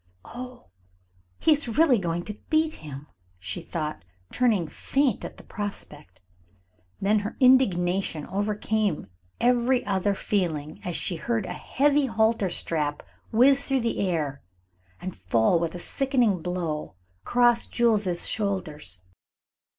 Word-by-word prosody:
"Oh, 250 Hz, +1 st, -9 dB, 0.7 s
he 320 Hz, -, +3 dB
is 295 Hz, -3 st, +3 dB
really 295 Hz, -8 st, +5 dB
going 175 Hz, -1 st, -2 dB
to 210 Hz, -, -6 dB, 0.2 s
beat 315 Hz, 0 st, +2 dB
him," 145 Hz, -2 st, -9 dB, 0.3 s
she 90 Hz, +1 st, -5 dB
thought, 155 Hz, -, -4 dB, 0.3 s
turning 220 Hz, -9 st, +2 dB
faint 270 Hz, -, 0 dB
at -, -, -7 dB
the -, -, -12 dB
prospect. 200 Hz, -8 st, -7 dB, 0.8 s
Then 210 Hz, +2 st, +3 dB
her 205 Hz, +2 st, -5 dB
indignation 190 Hz, -, +3 dB
overcame 205 Hz, -2 st, -1 dB, 0.3 s
every 245 Hz, +1 st, +2 dB
other 200 Hz, 0 st, +1 dB
feeling 160 Hz, -8 st, -2 dB
as 175 Hz, -, -3 dB
she 175 Hz, -, 0 dB
heard 225 Hz, +3 st, -1 dB
a -, -, -4 dB
heavy 285 Hz, 0 st, +2 dB
halter 220 Hz, -3 st, +2 dB
strap 150 Hz, -4 st, -1 dB, 0.3 s
whiz 270 Hz, +5 st, +5 dB
through 270 Hz, -2 st, +1 dB
the 230 Hz, 0 st, -1 dB
air 155 Hz, -7 st, -1 dB, 0.6 s
and 185 Hz, 0 st, -6 dB
fall 110 Hz, -, +2 dB
with 170 Hz, 0 st, -2 dB
a -, -, -3 dB
sickening 240 Hz, -, +1 dB
blow 170 Hz, -, -3 dB, 0.3 s
across 240 Hz, -, +3 dB
Jules's 210 Hz, -7 st, +2 dB
shoulders. 160 Hz, -, -2 dB
200 Hz, 125 wpm, -26 LUFS, 165-240 Hz, 0.8 s, really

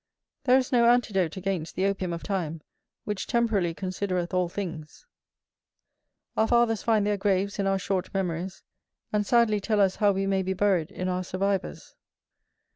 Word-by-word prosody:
There 255 Hz, 0 st, +6 dB
is 260 Hz, -1 st, -1 dB
no 235 Hz, -2 st, +5 dB
antidote 195 Hz, -8 st, +1 dB
against 185 Hz, -4 st, -3 dB
the 185 Hz, -, 0 dB
opium 195 Hz, -2 st, -1 dB
of 170 Hz, 0 st, -5 dB
time, 165 Hz, -6 st, -3 dB, 0.4 s
which 210 Hz, -2 st, -4 dB
temporally 210 Hz, -8 st, +1 dB
considereth 185 Hz, -1 st, -3 dB
all 180 Hz, -1 st, +1 dB
things: 170 Hz, -5 st, -7 dB, 1.3 s
our 220 Hz, -, +2 dB
fathers 235 Hz, -3 st, +3 dB
find 220 Hz, -3 st, +2 dB
their 205 Hz, 0 st, +1 dB
graves 200 Hz, 0 st, 0 dB
in 195 Hz, -, +1 dB
our 195 Hz, 0 st, +2 dB
short 190 Hz, -1 st, -2 dB
memories, 185 Hz, -1 st, -3 dB, 0.5 s
and 210 Hz, -1 st, +1 dB
sadly 235 Hz, -3 st, +3 dB
tell 210 Hz, +1 st, 0 dB
us 195 Hz, -2 st, +3 dB
how 205 Hz, -1 st, +4 dB
we 195 Hz, 0 st, -1 dB
may 195 Hz, -1 st, +1 dB
be 190 Hz, 0 st, -1 dB
buried 185 Hz, -4 st, +1 dB
in 185 Hz, -2 st, -4 dB
our 185 Hz, 0 st, -1 dB
survivors. 195 Hz, +1 st, -2 dB
195 Hz, 165 wpm, -27 LUFS, 185-210 Hz, 1.3 s, There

